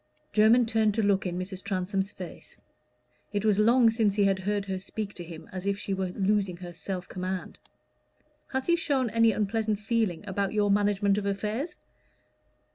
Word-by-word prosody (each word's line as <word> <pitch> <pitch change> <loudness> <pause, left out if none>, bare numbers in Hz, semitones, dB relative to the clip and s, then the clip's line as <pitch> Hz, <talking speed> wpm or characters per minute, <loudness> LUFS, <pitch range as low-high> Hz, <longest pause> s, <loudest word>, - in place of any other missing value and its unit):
Jermyn 225 +3 +5
turned 220 -2 +2
to 220 - +1
look 195 -2 +2
in 175 0 -3
Mrs. 185 +1 -5
Transome's 195 0 -1
face: 180 -2 -10 0.7
it 205 0 -1
was 210 -2 +3
long 230 +2 +5
since 220 -3 +1
he 205 - +3
had 195 -1 +2
heard 200 +1 -1
her 190 -1 -3
speak 205 +2 -5
to 175 - -7
him 165 -1 -10
as 185 +1 -5
if 200 0 +1
she 200 - -3
were 190 -1 -1
losing 195 -1 0
her 175 -1 -8
self 180 0 -5
command. 185 0 -5 0.9
"Has 265 -1 -2
he 340 - +4
shown 275 -8 0
any 230 +1 +4
unpleasant 215 0 0
feeling 215 -5 -1
about 200 +1 -1
your 205 -1 +2
management 205 0 +2
of 200 - -3
affairs?" 210 - -2
200 Hz, 180 wpm, -28 LUFS, 190-220 Hz, 0.9 s, Jermyn